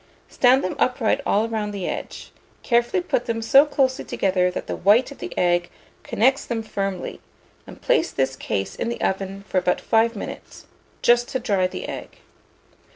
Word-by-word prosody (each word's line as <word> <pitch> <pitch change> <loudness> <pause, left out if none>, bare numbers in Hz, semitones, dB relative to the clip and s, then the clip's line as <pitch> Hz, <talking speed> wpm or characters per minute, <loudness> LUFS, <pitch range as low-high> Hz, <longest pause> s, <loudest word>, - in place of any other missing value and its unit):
Stand 255 +1 +4
them 185 - -2
upright 255 +1 +1
all 215 +3 +2
round 215 -2 -3
the 195 -3 -4
edge; - - -6 0.3
carefully 240 +10 +1
put 300 -9 -1
them 230 -1 -1
so 275 +6 +5
closely 265 -3 0
together 185 -2 +1
that 180 - -5
the - - -4
white 220 +8 +3
of 280 - -12
the - - -6
egg 175 0 +2 0.3
connects 265 +5 +2
them 230 -2 -3
firmly, 195 -3 -4 0.5
and - - -13
place - - +2
this 135 0 -1
case 95 -6 -3
in - - -3
the 235 - -4
oven 195 +1 -2
for 185 - +1
about 180 - 0
5 230 +1 +2
minutes, 200 - -8 0.4
just 240 0 +4
to 260 - -2
dry 200 -6 +1
the - - -7
egg. - - -8
225 Hz, 175 wpm, -23 LUFS, 190-250 Hz, 0.5 s, so